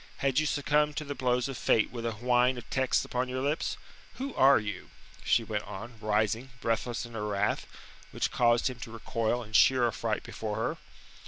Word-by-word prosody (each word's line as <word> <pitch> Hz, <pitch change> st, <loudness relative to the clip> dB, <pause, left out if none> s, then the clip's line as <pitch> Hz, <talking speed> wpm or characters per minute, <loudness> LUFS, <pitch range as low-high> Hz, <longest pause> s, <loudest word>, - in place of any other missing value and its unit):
Had 135 Hz, 0 st, +2 dB
you 155 Hz, -, +1 dB
succumbed 150 Hz, +1 st, +1 dB
to 150 Hz, -, -2 dB
the 145 Hz, -, -4 dB
blows 125 Hz, -1 st, 0 dB
of 135 Hz, -2 st, -6 dB
fate 110 Hz, -, +2 dB
with 115 Hz, -1 st, -4 dB
a 115 Hz, -, -2 dB
whine 125 Hz, +3 st, +2 dB
of 120 Hz, -, -8 dB
texts 130 Hz, -1 st, +1 dB
upon 125 Hz, +1 st, -2 dB
your 130 Hz, 0 st, -2 dB
lips? 145 Hz, +3 st, -1 dB, 0.4 s
Who 270 Hz, 0 st, -4 dB
are 135 Hz, +1 st, +6 dB
you?" 105 Hz, -7 st, -5 dB, 0.3 s
she 115 Hz, -, +3 dB
went 105 Hz, -1 st, -3 dB
on, 110 Hz, +3 st, -8 dB
rising, 110 Hz, +4 st, 0 dB
breathless 115 Hz, +1 st, -1 dB
in 120 Hz, -, -11 dB
her 105 Hz, -2 st, -3 dB
wrath, 105 Hz, 0 st, 0 dB, 0.4 s
which -, -, -2 dB
caused 120 Hz, 0 st, +3 dB
him 125 Hz, -2 st, -4 dB
to 115 Hz, -, -8 dB
recoil 115 Hz, +1 st, -1 dB
in 110 Hz, -1 st, -14 dB
sheer 125 Hz, +1 st, +5 dB
affright 115 Hz, -, -2 dB
before -, -, -5 dB
her. -, -, -2 dB
120 Hz, 195 wpm, -29 LUFS, 110-130 Hz, 0.4 s, are